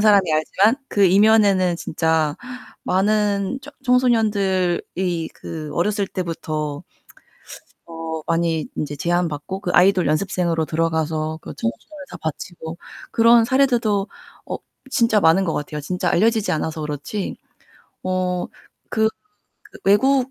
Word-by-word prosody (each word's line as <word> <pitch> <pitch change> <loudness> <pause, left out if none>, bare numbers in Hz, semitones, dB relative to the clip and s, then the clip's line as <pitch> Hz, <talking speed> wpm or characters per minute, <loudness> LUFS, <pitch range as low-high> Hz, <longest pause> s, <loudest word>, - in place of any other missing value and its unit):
사람이 205 -2 +6
알지만 195 +9 +2
그 200 -1 +3
이면에는 195 -2 +4
진짜 160 -2 0 0.5
많은 205 +3 +1
처 290 0 -11
청소년들이 190 -8 +1
그 155 -2 -7
어렸을 200 +3 0
때부터 155 -3 -4 1.0
어 165 -1 -5
많이 165 -1 0
인제 145 -1 -3
제안받고 175 +3 -1
그 180 -3 -3
아이돌 185 -1 +4
연습생으로 165 0 0
들어가서 160 0 -1
그 - - -8
청춘을 115 - -5
다 - - -8
바치고 160 +1 -6 0.3
그런 230 0 +5
사례들도 235 -6 +2 0.4
어 - - -3 0.3
진짜 230 -4 +3
많은 185 +1 +4
것 165 - -1
같아요 150 0 -4
진짜 180 +4 -1
알려지지 220 +2 +2
않아서 160 0 -2
그렇지. 150 +7 -4 0.7
어 185 -1 -1 0.4
그 220 -1 +2 0.5
그 - - -15
외국 260 +6 +3
185 Hz, 265 characters per minute, -21 LUFS, 160-210 Hz, 1.0 s, 사람이